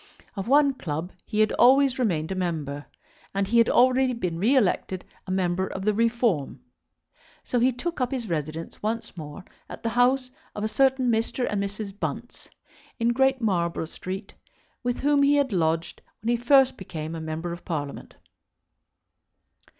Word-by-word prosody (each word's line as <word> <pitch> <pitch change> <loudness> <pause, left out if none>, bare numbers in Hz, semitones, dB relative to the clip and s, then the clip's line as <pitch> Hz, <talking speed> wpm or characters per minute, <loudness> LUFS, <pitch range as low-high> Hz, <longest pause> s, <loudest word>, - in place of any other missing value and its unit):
Of 195 0 -4
one 280 +1 +5
club 165 - -4 0.2
he 215 -1 +1
had 215 - +3
always 265 +1 +5
remained 175 -9 0
a - - +1
member, 155 -6 -3 0.5
and 195 0 +1
he 235 +3 +3
had 230 - +5
already 255 +1 +4
been 180 -8 -3
re 235 +9 +3
elected 190 -5 +1 0.2
a - - -3
member 185 0 0
of 190 0 -6
the 215 - +3
Reform. 230 - +1 0.8
So 245 - 0
he 250 +2 +4
took 330 +5 -4
up 250 - +1
his 255 -5 -3
residence 160 -1 -4
once 225 +1 -3
more 155 +3 -8 0.2
at - - -9
the 230 - 0
house 255 +2 +2 0.2
of 210 - -4
a - - +1
certain 260 +1 +2
Mr. 230 +3 0
and 205 -1 -1
Mrs. 200 0 -5
Bunce, - - -5 0.5
in 230 0 +2
Great 265 +1 +2
Marlborough 170 -6 0
Street, 190 +5 -7 0.5
with 245 -1 -2
whom 285 0 +3
he 285 +1 +5
had 280 -5 +1
lodged 165 -2 0 0.2
when 230 - -1
he 240 - +3
first 260 +2 +4
became 160 -4 -6
a 165 - -5
member 160 +2 -4
of 175 - -9
Parliament. 145 -4 -5
215 Hz, 170 wpm, -26 LUFS, 175-250 Hz, 0.8 s, one